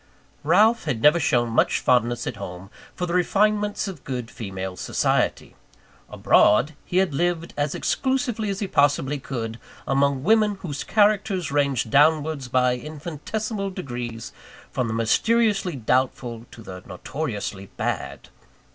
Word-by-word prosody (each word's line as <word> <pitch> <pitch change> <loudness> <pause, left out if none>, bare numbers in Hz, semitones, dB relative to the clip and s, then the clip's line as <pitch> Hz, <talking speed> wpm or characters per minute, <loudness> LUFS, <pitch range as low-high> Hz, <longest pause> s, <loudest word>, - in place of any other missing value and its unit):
Ralph 225 0 +4
had 135 -7 -1
never 150 +7 +5
shown 120 -6 +1
much 115 - +2
fondness 120 -1 +1
at 115 - -4
home, 95 -1 -8 0.2
for 180 - -2
the 170 - -4
refinements 205 +3 +1
of 180 -8 -8
good 125 -3 -5
female 95 -3 -6
society. - - -1 0.5
Abroad, 135 +9 +3
he 180 - -3
had 190 -5 +2
lived 170 +2 -1
as 145 0 -1
exclusively 250 -5 -1
as 195 +1 -3
he 200 - -1
possibly 145 -2 +2
could, 115 -4 -5 0.3
among 140 -1 +1
women 215 +2 +3
whose 145 -5 -4
characters 205 -5 +2
ranged 140 -6 0
downwards 150 -1 +3
by 125 0 +2
infinitesimal 170 - -5
degrees, 120 - -6 0.4
from 125 -2 -1
the 110 - -3
mysteriously 200 - +2
doubtful 125 -1 -1
to 115 - -13
the 90 -2 -9
notoriously 105 - -5
bad. - - -4
145 Hz, 135 wpm, -24 LUFS, 120-190 Hz, 0.5 s, never